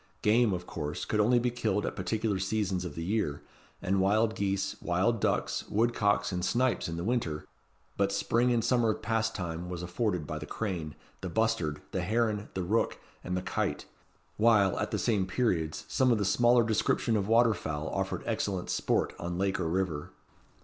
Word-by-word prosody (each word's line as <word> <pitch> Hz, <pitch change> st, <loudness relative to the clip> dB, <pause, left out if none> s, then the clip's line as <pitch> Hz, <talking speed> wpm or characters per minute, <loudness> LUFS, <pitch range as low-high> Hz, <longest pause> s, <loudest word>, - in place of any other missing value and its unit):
Game, 110 Hz, +1 st, +4 dB
of 90 Hz, -1 st, -3 dB
course, 75 Hz, -3 st, -4 dB
could 105 Hz, -, -1 dB
only 120 Hz, +4 st, +4 dB
be 120 Hz, 0 st, +1 dB
killed 105 Hz, -4 st, 0 dB
at -, -, -3 dB
particular 105 Hz, +1 st, -1 dB
seasons 95 Hz, -2 st, -1 dB
of 80 Hz, -5 st, -6 dB
the 80 Hz, -, -4 dB
year; 95 Hz, -6 st, -1 dB, 0.4 s
and 95 Hz, +1 st, +2 dB
wild 110 Hz, +3 st, +3 dB
geese, 100 Hz, -1 st, -1 dB
wild 95 Hz, +6 st, +1 dB
ducks, -, -, 0 dB
woodcocks, 105 Hz, -2 st, +2 dB
and 90 Hz, -1 st, -2 dB
snipes 125 Hz, +4 st, +1 dB
in 85 Hz, -, -4 dB
the 85 Hz, -, -3 dB
winter; 95 Hz, -9 st, -1 dB, 0.5 s
but 100 Hz, 0 st, +2 dB
spring 115 Hz, +5 st, +2 dB
and 115 Hz, -2 st, +1 dB
summer 115 Hz, -4 st, +3 dB
pastime 95 Hz, -7 st, -2 dB
was 90 Hz, -1 st, -5 dB
afforded 90 Hz, -2 st, -1 dB
by 75 Hz, +1 st, -4 dB
the 75 Hz, -, -7 dB
crane, 85 Hz, -9 st, -4 dB, 0.3 s
the 95 Hz, -, -4 dB
bustard, 85 Hz, -8 st, 0 dB
the 95 Hz, -, -1 dB
heron, 105 Hz, +1 st, 0 dB
the 95 Hz, -, -1 dB
rook, 105 Hz, +6 st, +1 dB, 0.3 s
and 90 Hz, +1 st, -2 dB
the 90 Hz, -, -3 dB
kite; -, -, -2 dB, 0.5 s
while, 105 Hz, -4 st, +4 dB
at -, -, -1 dB
the -, -, -1 dB
same 100 Hz, -5 st, +1 dB
periods, 90 Hz, -7 st, -1 dB
some 130 Hz, -1 st, +2 dB
of 115 Hz, -, +3 dB
the 100 Hz, -, 0 dB
smaller 120 Hz, +5 st, +4 dB
description 110 Hz, +1 st, +1 dB
of 100 Hz, -2 st, 0 dB
water 115 Hz, 0 st, +5 dB
fowl 80 Hz, -4 st, -4 dB
offered -, -, -2 dB
excellent 95 Hz, -3 st, -2 dB
sport -, -, 0 dB
on 85 Hz, +1 st, -3 dB
lake 95 Hz, 0 st, 0 dB
or 85 Hz, -, 0 dB
river. 85 Hz, -4 st, -1 dB
100 Hz, 185 wpm, -30 LUFS, 90-115 Hz, 0.5 s, water